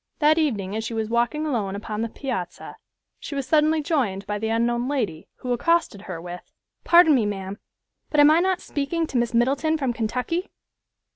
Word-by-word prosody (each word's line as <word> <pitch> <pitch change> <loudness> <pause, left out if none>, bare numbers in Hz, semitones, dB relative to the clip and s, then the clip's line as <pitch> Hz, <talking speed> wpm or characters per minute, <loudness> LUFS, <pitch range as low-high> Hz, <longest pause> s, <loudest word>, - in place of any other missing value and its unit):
That 310 +1 +4
evening 210 -10 -1
as 220 - -2
she 230 0 -4
was 220 0 -2
walking 240 +6 +1
alone 215 -10 -1
upon 210 +1 -4
the 230 - -2
piazza, 235 -9 -5 0.4
she 290 - -7
was 275 -1 -2
suddenly 310 0 +3
joined 225 - -1
by 205 +1 -3
the 220 - -2
unknown 235 +2 +1
lady, 230 - -2
who 250 -1 -1
accosted 325 -5 +1
her 175 -3 -4
with, 175 +1 -9 0.3
"Pardon 340 -2 +6
me, 235 -6 +2
ma'am, 195 0 -5 0.5
but 300 - +1
am 290 +1 +8
I 320 - +5
not 370 0 +1
speaking 305 +4 -2
to 275 - -3
Miss 235 0 -1
Middleton 275 +7 +2
from 265 -5 -1
Kentucky?" 250 - -2
245 Hz, 190 wpm, -24 LUFS, 215-305 Hz, 0.5 s, am